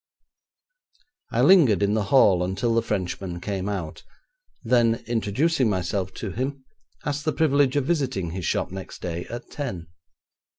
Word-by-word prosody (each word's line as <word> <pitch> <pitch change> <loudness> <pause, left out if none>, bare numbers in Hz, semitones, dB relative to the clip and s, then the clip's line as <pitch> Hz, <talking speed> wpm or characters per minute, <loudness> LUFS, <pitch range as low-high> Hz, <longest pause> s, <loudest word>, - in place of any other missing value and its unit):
I 120 - +2
lingered 140 - +6
in 100 +1 +2
the 110 -2 0
hall 100 -6 +5
until 95 +6 -1
the 115 - +3
Frenchman 95 -4 -3
came 100 +1 -3
out, 90 -6 -4 0.6
then, 115 -1 +2
introducing 120 +5 +1
myself 95 0 -1
to 105 - -5
him, 135 +3 -4 0.4
asked 145 0 -2
the 155 - +1
privilege 145 -4 +2
of 145 -2 +1
visiting 135 - -1
his 90 +1 -5
shop 90 - -1
next 95 0 -8
day 85 0 -4
at 120 - -8
ten. 95 - -5
110 Hz, 145 wpm, -24 LUFS, 95-135 Hz, 0.6 s, lingered